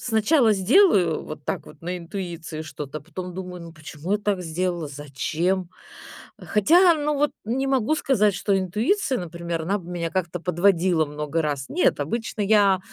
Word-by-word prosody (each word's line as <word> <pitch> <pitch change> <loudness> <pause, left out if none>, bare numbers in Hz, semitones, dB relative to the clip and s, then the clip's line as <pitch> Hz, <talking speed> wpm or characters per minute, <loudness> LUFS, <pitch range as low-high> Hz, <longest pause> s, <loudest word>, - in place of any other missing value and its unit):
сначала 230 +1 +3
сделаю 195 - +4
вот 155 -1 -9
так - - -3
вот 150 0 -15
на 180 +2 -3
интуиции 170 -3 -6
что-то, 150 -1 -7
а - - -17
потом 180 +2 -7
думаю, 180 -1 -7
ну, 165 - -10
почему 155 +4 -6
я 210 - +2
так 205 -2 -1
сделала, 175 -1 -2
зачем? 155 +6 -2 0.7
Хотя, 340 - +5
ну, 300 -1 -1
вот 295 +1 +1
не 255 +5 -1
могу 270 +1 +2
сказать, 210 -9 +2
что 195 +2 +1
интуиция, 235 - 0
например, 170 -1 -4
она 195 +5 0
бы 175 -2 -11
меня 170 -1 -2
как-то 180 -1 -2
подводила 175 -1 +2
много 150 +2 -3
раз. 145 -3 -2
Нет, 180 - +1
обычно 225 +9 -3
я, 200 -2 +4
180 Hz, 165 wpm, -24 LUFS, 165-210 Hz, 0.7 s, Хотя